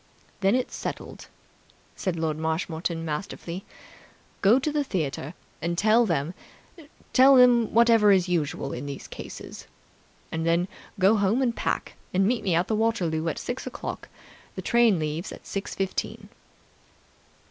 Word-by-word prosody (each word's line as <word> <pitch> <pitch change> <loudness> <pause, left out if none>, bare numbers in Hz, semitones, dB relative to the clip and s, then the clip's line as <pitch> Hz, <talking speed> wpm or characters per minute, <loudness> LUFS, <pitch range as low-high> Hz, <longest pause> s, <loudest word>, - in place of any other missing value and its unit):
"That's 205 +6 +1
settled, - - -6
then," - - -12 0.7
said 185 -3 -2
Lord 160 -2 -1
Marshmoreton 165 +1 -2
masterfully. 170 +3 -5 0.8
"Go 205 +5 +6
to 275 +3 -1
the 295 -1 0
theatre 155 - -3 0.3
and 170 +2 -2
tell 220 +4 +4
them 165 -1 -1 0.8
tell 270 +2 +7 0.3
whatever 230 -2 +5
is 190 -2 +4
usual 150 -5 -1
in 135 +4 -5
these 140 -1 -7
cases. - - -9 0.6
And 160 0 -2
then 170 +2 +2 0.3
go 195 +3 +4
home 210 +6 +2
and 235 -2 0
pack, - - -2 0.2
and 190 +1 +4
meet 235 +3 +1
me 185 -4 +1
at 175 +5 +1
Waterloo 195 -8 0
at - - -4
six 245 - -5
o'clock. - - -6 0.5
The - - -5
train 235 -5 +4
leaves 155 +3 -3
at - - -11
six 195 0 -4
fifteen." 195 -1 -3
185 Hz, 140 wpm, -26 LUFS, 160-225 Hz, 0.8 s, tell